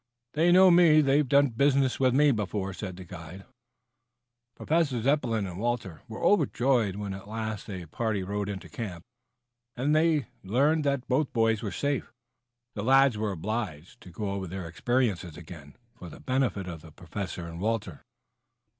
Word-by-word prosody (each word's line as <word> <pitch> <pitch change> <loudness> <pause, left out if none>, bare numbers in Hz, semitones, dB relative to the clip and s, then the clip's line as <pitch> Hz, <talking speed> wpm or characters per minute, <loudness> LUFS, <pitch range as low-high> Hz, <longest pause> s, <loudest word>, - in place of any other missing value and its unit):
They 165 +3 +3
know 185 +1 +7
me. 170 -3 +6
They've 140 -1 +2
done 140 0 +5
business 135 +2 +2
with 130 -1 +4
me 145 +1 +5
before." 100 -3 -2
Professor 90 -2 -8 1.6
Zepplin 120 -4 +1
and 90 -1 -7
Walter 110 -8 -3
were 110 - -7
overjoyed 125 - +2
when 100 -1 -4
at 95 +1 -9
last 110 -1 -5
the 95 -4 -6
party 105 +4 -2
rode 100 +1 -3
into 100 -2 -6
camp 90 -8 -6 0.7
and 140 +5 +1
they 155 -4 +3 0.2
learned 145 +10 +2
that 140 -2 0
both 140 +2 +1
boys 115 -2 +2
were 110 - -3
safe. 140 -5 -2 0.6
The 105 - -4
lads 135 0 +5
were 105 -1 -2
obliged 95 -3 -5
to - - -12
go 100 +4 -5
all 100 - -2
over 95 -1 -4
their 95 0 -6
experiences 95 -3 -1
again 80 -4 -12 0.2
for 90 - -11
the - - -12
benefit 130 -8 -1
of 85 -3 -7
the 80 - -14
Professor 90 +2 -6
and 85 0 -8
Walter. 100 -7 -2
110 Hz, 160 wpm, -28 LUFS, 95-135 Hz, 1.6 s, know